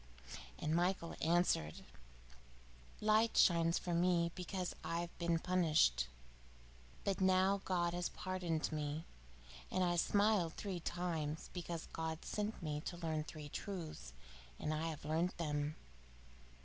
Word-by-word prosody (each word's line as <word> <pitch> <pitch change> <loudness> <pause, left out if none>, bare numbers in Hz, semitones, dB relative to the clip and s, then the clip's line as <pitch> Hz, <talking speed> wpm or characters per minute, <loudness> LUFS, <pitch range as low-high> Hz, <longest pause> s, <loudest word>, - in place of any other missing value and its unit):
And 155 +1 0
Michael 175 0 +1
answered: 165 - +2 1.2
"Light 215 +1 +4
shines 170 -1 +5
from 175 -2 0
me 170 -2 +3
because 180 0 -3
I 170 0 -1
have 175 0 -6
been 170 -1 +2
punished, 155 - +3 1.0
but 195 -1 0
now 190 +1 +4
God 175 -2 +1
has 175 0 -1
pardoned 175 -4 -2
me. 150 +1 -2 0.6
And 185 - +1
I 175 -1 +2
smiled 200 -2 +3
three 190 -4 -4
times, 165 -3 -2
because 170 -2 -4
God 160 0 -3
sent 210 -2 -2
me 150 -1 -2
to 175 - -4
learn 160 -3 -1
three 155 -2 -7
truths, 155 - -5 0.4
and 155 - -1
I 155 +1 -1
have 155 -3 -5
learnt 165 +4 0
them. 150 -2 -1
170 Hz, 130 wpm, -38 LUFS, 155-185 Hz, 1.2 s, shines